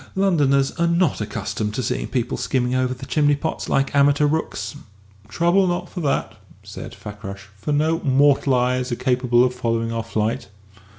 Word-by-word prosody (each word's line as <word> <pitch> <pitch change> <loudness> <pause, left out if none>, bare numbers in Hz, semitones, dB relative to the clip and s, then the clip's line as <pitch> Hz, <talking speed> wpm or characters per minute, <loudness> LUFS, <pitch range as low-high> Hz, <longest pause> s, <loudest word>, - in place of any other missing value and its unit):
Londoners 145 -8 +2
are 170 - +3
not 170 -7 +1
accustomed 105 0 -3
to 130 - -2
seeing - - -2
people 125 -2 -2
skimming 125 -1 -1
over 130 0 +1
the 130 +1 -6
chimney 145 0 +2
pots 160 +3 -4
like 135 0 +1
amateur 145 +1 +4
rooks." 155 0 -2 0.5
"Trouble 175 - +2
not 180 0 -2
for 180 - -6
that," 135 -8 -1 0.3
said - - -9
Fakrash, 100 -1 -9
"for 100 +9 -4
no 155 +3 +2
mortal 140 -2 +3
eyes 125 +1 0
are - - 0
capable 125 -1 +2
of 125 0 +1
following 115 -2 -1
our 115 - -1
flight." 110 -1 -2
130 Hz, 170 wpm, -22 LUFS, 120-150 Hz, 0.5 s, amateur